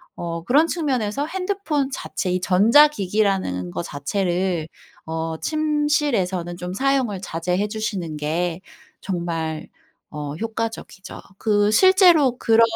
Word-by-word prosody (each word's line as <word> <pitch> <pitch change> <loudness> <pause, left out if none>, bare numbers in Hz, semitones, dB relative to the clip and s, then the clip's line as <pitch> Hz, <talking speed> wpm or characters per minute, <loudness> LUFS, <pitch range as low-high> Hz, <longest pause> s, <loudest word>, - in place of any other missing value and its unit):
어 170 -1 -5
그런 300 +6 +4
측면에서 275 -6 -1
핸드폰 365 -6 -2
자체 185 -7 -3
이 180 - 0
전자기기라는 195 - +3
거 85 0 -4
자체를 175 +2 -2 0.4
어 160 0 -3
침실에서는 295 - 0
좀 180 +1 -5
사용을 260 -4 0
자제해 180 +3 -2
주시는 205 -7 -3
게 165 +4 -2 0.4
정말 165 -4 -3 0.4
어 150 -1 -5
효과적이죠. 225 -3 -5 0.2
그 205 -1 +2
실제로 345 - +5
그런 225 -1 +3
200 Hz, 255 characters per minute, -22 LUFS, 170-275 Hz, 0.4 s, 실제로